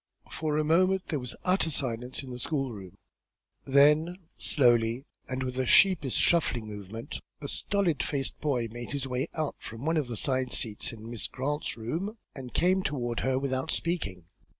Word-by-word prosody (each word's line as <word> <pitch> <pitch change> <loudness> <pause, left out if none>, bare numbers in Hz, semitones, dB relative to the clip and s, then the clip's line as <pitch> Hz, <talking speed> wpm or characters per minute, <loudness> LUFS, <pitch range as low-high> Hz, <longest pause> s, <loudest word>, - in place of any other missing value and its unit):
For 155 -1 -1
a 155 - +2
moment 185 +4 +3
there 150 - 0
was 125 -2 -3
an - - -16
utter 185 -2 +3
silence 125 -2 -2
in 130 - -8
the 125 - -6
school 135 -1 -1
room. 95 -5 -10 0.7
Then, 150 +5 +5 0.2
slowly, 120 -1 +3 0.2
and 130 0 -2
with 125 0 -3
a 130 - 0
sheepish 175 -8 +5
shuffling 140 -9 +3
movement, 105 +1 -7 0.2
a - - -5
stolid 195 -7 0
faced 135 -2 -2
boy 130 -6 0
made 120 +3 -6
his 140 -2 -1
way 130 0 -1
out 155 -3 -2
from 115 +5 -8
one 165 +1 +2
of 150 -4 0
the 120 -2 -4
side 130 0 +1
seats 110 -3 0
in 115 0 -9
Miss 120 - -1
Grant's 145 +2 -3
room, 170 - -3 0.2
and 130 -3 -8
came 185 +2 +3
toward 120 -8 -2
her 130 +1 +1
without 130 -1 -1
speaking. 100 - -1
130 Hz, 180 wpm, -29 LUFS, 120-155 Hz, 0.7 s, Then